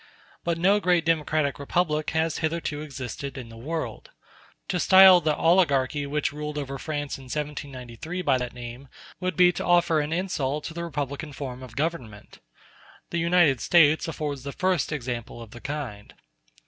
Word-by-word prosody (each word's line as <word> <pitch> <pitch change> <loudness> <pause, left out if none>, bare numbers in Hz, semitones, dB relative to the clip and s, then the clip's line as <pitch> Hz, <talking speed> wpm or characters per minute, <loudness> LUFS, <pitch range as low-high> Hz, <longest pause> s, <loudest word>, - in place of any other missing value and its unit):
But 170 -1 0
no 195 +5 +4
great 180 -4 +2
democratic 155 -3 +1
republic 155 +1 0
has 160 -1 0
hitherto 160 -2 -2
existed 135 -1 -6
in 125 -3 -7
the 115 - -12
world. 160 - -5 0.6
To 180 -2 0
style 190 0 +8
the 155 -2 +1
oligarchy 145 -5 +2
which 145 0 -1
ruled 150 0 -5
over 135 -2 -4
France 145 -2 -4
in 135 - -12
1793 145 +3 -5
by 130 - +3
that 125 -1 -4
name 120 +2 -9 0.3
would 185 -2 -2
be 180 -1 +6
to 175 - -5
offer 175 -2 +3
an 150 +1 -2
insult 150 -5 -1
to - - -6
the 170 +1 -4
republican 145 -1 -4
form 130 -2 -6
of 125 -3 -11
government. 140 -9 -4 0.7
The 170 - -1
United 170 -6 +3
States 160 -2 +4
afford 150 -3 -3
the 140 +2 -6
first 185 -4 0
example 120 -5 -4
of 115 -2 -10
the 120 -1 -11
kind. 130 -8 -6
150 Hz, 165 wpm, -26 LUFS, 135-170 Hz, 0.7 s, style